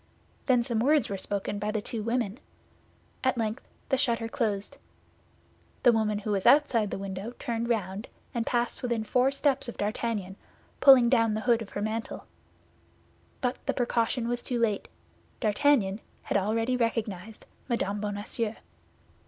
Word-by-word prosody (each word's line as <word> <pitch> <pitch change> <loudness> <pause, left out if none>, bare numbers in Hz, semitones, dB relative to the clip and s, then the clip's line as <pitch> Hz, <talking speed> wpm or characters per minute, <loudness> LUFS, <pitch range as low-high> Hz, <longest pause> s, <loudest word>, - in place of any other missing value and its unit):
Then 250 -3 +4
some 235 -2 -1
words 285 +1 +3
were 200 - -2
spoken 200 +1 -2
by 210 +1 -2
the 215 0 0
two 220 +2 -4
women. 230 0 -1 0.8
At 260 -2 +2
length 225 +1 -2 0.2
the 265 - +3
shutter 230 -1 +1
closed. 210 -4 -2 1.1
The 245 - +7
woman 215 -2 +1
who 210 +1 -3
was 195 -2 +1
outside 260 -8 +5
the - - -3
window 195 +4 -5
turned 235 0 -3
round, 205 -1 -1 0.3
and 235 -2 0
passed 240 0 -1
within 235 -3 -1
four 250 +4 +3
steps 275 -2 0
of - - -8
D'Artagnan, 205 -2 -2 0.4
pulling 265 -4 +8
down 230 -3 +3
the 215 - -2
hood 235 -1 +3
of 215 - -7
her 205 - -2
mantle; 220 +1 -3 1.2
but 250 -2 -2
the - - +1
precaution 235 -1 0
was 240 0 -1
too 245 - -2
late, 215 -4 0 0.5
D'Artagnan 215 -3 +2 0.2
had - - -3
already 225 +5 +1
recognized 220 -4 -2 0.2
Mme. 205 -4 0
Bonacieux. 210 +2 -3
225 Hz, 155 wpm, -28 LUFS, 210-240 Hz, 1.2 s, pulling